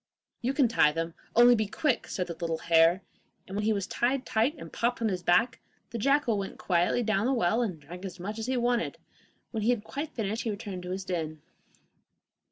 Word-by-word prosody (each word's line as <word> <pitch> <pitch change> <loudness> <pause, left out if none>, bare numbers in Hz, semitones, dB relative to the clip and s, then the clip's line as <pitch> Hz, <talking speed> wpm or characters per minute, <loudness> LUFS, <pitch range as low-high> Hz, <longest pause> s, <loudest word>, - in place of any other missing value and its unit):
'You 255 +3 0
can 270 -4 +4
tie 220 -9 +4
them, 165 +1 -3 0.2
only 240 +1 +8
be 215 -3 +1
quick,' 280 +3 0
said 180 - -2
the 170 - -5
little 165 -1 -2
hare, 165 +3 +4 0.4
and 190 - -8
when 210 +1 -1
he 220 - +3
was 200 -3 0
tied 260 +2 0
tight 230 +8 +1
and - - -10
popped 240 +1 0
on 225 -2 +1
his 185 -2 -2
back, 180 +8 +3 0.3
the 235 - -4
jackal 275 -3 +2
went 195 - -5
quietly 180 +6 +1
down 215 -1 +1
to - - +2
the - - +2
well, 225 0 +2
and 190 -9 -2
drank 180 +5 -10
as 185 -2 -7
much 210 +5 -5
as 225 - -4
he 260 0 0
wanted. 240 0 0 0.5
When 220 - -2
he 215 - +1
had 240 -4 +1
quite 290 +6 -5
finished 220 0 -2
he 230 - -2
returned 200 -3 -5
to 180 - -7
his 190 +1 -4
den. 160 -4 -3
210 Hz, 225 wpm, -29 LUFS, 180-240 Hz, 0.5 s, only